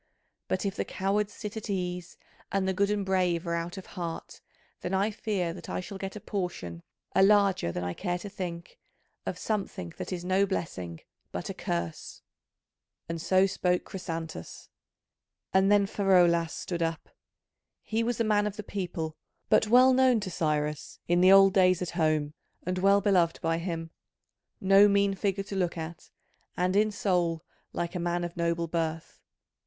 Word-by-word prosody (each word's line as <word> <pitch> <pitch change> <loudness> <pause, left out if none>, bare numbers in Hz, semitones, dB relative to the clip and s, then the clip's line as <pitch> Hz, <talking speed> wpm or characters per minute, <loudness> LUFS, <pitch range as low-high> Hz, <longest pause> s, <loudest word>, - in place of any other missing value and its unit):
But 185 - -1
if 195 - -1
the - - -1
cowards 200 +2 -1
sit 210 0 -7
at 220 0 -6
ease 180 -2 -3 0.3
and 195 -1 0
the 190 - +1
good 200 +2 +1
and 205 -1 0
brave 180 -2 +1
are 170 - -1
out 170 +3 -3
of 190 - -7
heart, 170 -2 -6 0.4
then 180 +2 -2
I 200 +3 +2
fear 195 -5 -2
that 170 -1 -10
I - - -2
shall 190 +2 -7
get 195 +1 -5
a - - -5
portion, 175 - -4 0.3
a - - +4
larger 200 - +4
than 90 - -4
I 90 0 -2
care 175 - -2
to 180 - -8
think, 175 -4 -6 0.5
of - - -2
something 195 - -3
that - - -5
is 180 -1 -4
no 190 +2 +3
blessing 90 - -4 0.3
but - - -4
a - - -6
curse." 85 -1 -4 0.8
And 165 0 -4
so 185 +2 +4
spoke 180 -2 0
Chrysantas, 165 - -6 0.8
and 190 +1 +4
then 205 -1 +5
Pheraulas 175 -5 +3
stood 170 -1 -4
up. 165 -1 -2 0.7
He 225 +1 -1
was 235 0 -1
a - - +3
man 210 -1 +2
of 210 - -4
the 210 - -6
people, 175 -6 -4 0.3
but 215 - +4
well 255 +3 +7
known 255 -2 +4
to 190 -2 -4
Cyrus 150 -2 -1
in 175 +1 +3
the 185 +1 +7
old 195 -1 +8
days 185 -2 +4
at 180 - -3
home 155 -3 +1 0.3
and 180 +1 -1
well 200 +1 +5
beloved 180 -4 +2
by 165 0 0
him: 165 -2 -4 0.7
no 195 +1 +6
mean 200 0 +3
figure 195 0 -1
to 195 - -7
look 180 -3 0
at, 160 +1 -7 0.5
and 180 +1 +1
in 215 +1 +4
soul 175 -5 0 0.3
like 170 0 -3
a 180 - -3
man 175 0 -1
of 175 0 -5
noble 170 0 0
birth. 165 -1 -3
185 Hz, 180 wpm, -28 LUFS, 170-200 Hz, 0.8 s, old